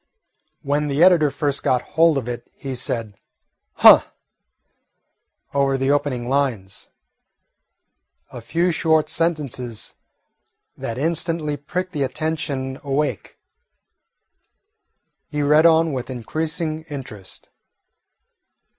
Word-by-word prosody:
When 145 +1 0
the 145 +3 +2
editor 175 -5 +5
first 140 0 -2
got 125 -1 +1
hold 165 -2 +4
of 125 -3 -3
it 120 0 -6
he 135 -1 -6
said 115 -4 -2 0.6
"Huh!" - - +8 1.5
over 140 -1 +2
the 135 +1 +1
opening 135 -4 -1
lines, 125 -8 -2 1.4
a 120 - -8
few 170 +10 0
short 160 -2 +2
sentences 140 -9 -2 0.8
that 115 - -5
instantly 160 0 -1
pricked 180 +6 -4
the 150 - -4
attention 140 -2 -3
awake. 145 +1 -2 1.9
He 150 -2 -2
read 150 +3 +5
on 165 -1 +3
with 130 -1 -4
increasing 155 +6 -3
interest. 125 -9 -9
145 Hz, 100 wpm, -21 LUFS, 130-160 Hz, 1.9 s, Huh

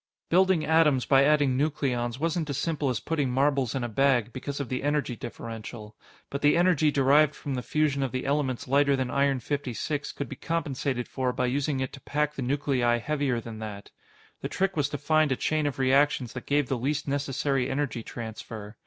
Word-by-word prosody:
Building 185 -2 +4
atoms 150 -5 +3
by 135 -1 +5
adding 145 -3 +3
nucleons 130 -4 -1
wasn't 165 0 -1
as 140 - -2
simple 150 -2 -1
as 125 - -1
putting 150 -5 -1
marbles 135 -1 +1
in 130 - -1
a - - -1
bag 120 -1 +2
because 140 +2 -5
of 140 - -3
the 130 +2 -3
energy 145 -3 0
differential, 110 -2 -8 0.4
but 140 - -3
the 145 +2 +4
energy 175 -4 +4
derived 145 +2 +4
from 140 - -5
the 125 - -2
fusion 150 0 0
of 135 -3 -1
the 130 0 -3
elements 140 -3 -1
lighter 140 +1 +3
than 130 -2 -2
Iron 140 -1 +2
56 145 +2 -3
could 140 - -4
be 135 - -7
compensated 140 -5 -2
for 130 -1 -1
by 125 0 -1
using 135 +2 0
it 130 - -3
to 140 - -10
pack 150 0 -1
the 140 - -5
nuclei 130 -2 +1
heavier 140 -1 -1
than 115 -2 -8
that. 105 -2 -7 0.5
The - - -3
trick 195 0 0
was 145 -2 +1
to 145 - -3
find 155 0 +2
a - - +3
chain 155 +3 0
of 145 - -3
reactions 135 -2 +2
that 125 - -8
gave 145 -1 +2
the 130 -1 -1
least 145 +4 -1
necessary 140 -1 0
energy 135 -4 -2
transfer. 110 -2 -8
140 Hz, 200 wpm, -27 LUFS, 125-145 Hz, 0.5 s, by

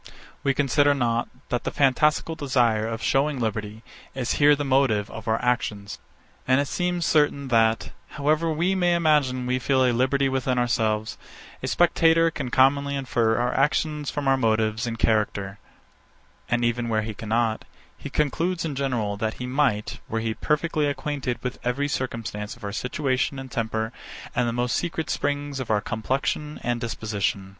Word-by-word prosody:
We 135 -1 +1
consider 145 +1 +3
not, 120 -2 0 0.2
that 125 - -1
the - - -1
fantastical 150 +4 +2
desire 125 -8 +1
of 115 0 -4
shewing 140 0 +1
liberty, 110 -1 -3 0.3
is 125 -3 -1
here 145 0 +7
the 145 0 -3
motive 130 -6 +2
of 110 - -9
our 110 0 +1
actions. 105 -4 -1 0.5
And 130 +1 +4
it 140 - 0
seems 180 +2 -1
certain, 145 -4 +2
that, 115 -1 +2 0.3
however 155 +3 +1
we 170 +5 +1
may 175 -2 +2
imagine 150 -6 +2
we 125 +1 0
feel 130 0 +2
a 125 - +3
liberty 130 +3 +2
within 130 -1 0
ourselves, 110 -3 0 0.4
a - - -3
spectator 165 -1 +4
can 130 - -4
commonly 140 +3 +3
infer 120 -4 +1
our 120 +1 0
actions 150 +1 0
from 145 -2 -3
our 135 0 +4
motives 110 -1 +1
and 115 -1 -3
character; 100 -3 0 0.9
and 120 0 +1
even 120 0 0
where 110 -1 +1
he 110 0 -4
cannot, 110 +1 -1 0.3
he - - -8
concludes 165 +4 0
in 155 - -2
general, 120 -7 -1
that 110 +1 -2
he 125 - -6
might, 125 -5 0
were 115 - -1
he 110 0 -1
perfectly 150 +3 0
acquainted 140 -4 -2
with 125 - -4
every 125 +4 0
circumstance 115 -6 -4
of 120 - -18
our 100 0 -4
situation 130 +2 -1
and 135 -1 -8
temper, 110 -1 -2 0.4
and 120 0 +1
the - - -1
most 120 +1 0
secret 165 -2 -2
springs 145 -1 -2
of 130 - -5
our 105 -1 +3
complexion 135 +7 -2
and 120 -1 -1
disposition. 105 -4 -2
125 Hz, 170 wpm, -25 LUFS, 115-145 Hz, 0.9 s, here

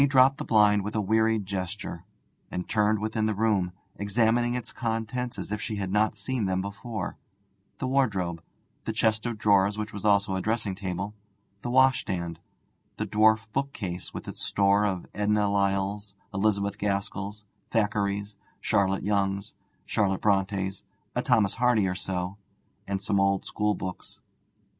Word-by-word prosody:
May 140 - +6
dropped 135 0 +5
the - - -3
blind 105 -2 +5
with 105 +2 -4
a - - +2
wearied 110 +1 +2
gesture, 95 -2 -4 0.4
and 90 - -4
turned 105 0 +2
within 110 +1 -1
the 110 - 0
room, 100 -4 +2 0.3
examining 115 +4 +2
its 125 - -5
contents 115 +1 -2
as - - -5
if 105 0 -2
she 110 - -3
had 95 -2 -3
not 105 +1 +2
seen 110 +2 -2
them 95 -1 0
before: 100 +2 -5 0.6
the - - -3
wardrobe, 100 -11 +1 0.4
the - - -1
chest 110 +1 +1
of 120 -2 -3
drawers, 100 0 +3
which 110 +1 -4
was 100 - -6
also 100 -2 +3
a 95 - -1
dressing 110 -1 0
table, 95 +1 -4 0.5
the 120 - -4
washstand, 95 -10 +2 0.6
the - - -1
dwarf 110 +2 +4
book 140 +1 -1
case 90 -4 -5
with - - -7
its - - -7
store 100 +1 +3
of 95 -3 -1
Edna 105 0 +2
Lyalls, 100 +1 0 0.2
Elizabeth 100 0 +1
Gaskells, 100 +1 -2 0.3
Thackerays, 105 -2 0 0.2
Charlotte 95 -2 +1
Yonges, 100 -1 0 0.3
Charlotte 95 -3 +1
Brontës, 95 -1 +1 0.3
a - - +2
Thomas 100 -3 +3
Hardy 120 -4 +3
or 90 - 0
so, 90 0 -3 0.5
and 100 0 -2
some 100 0 +1
old 95 0 +2
school 105 -1 0
books. 95 0 -7
105 Hz, 155 wpm, -27 LUFS, 95-110 Hz, 0.6 s, May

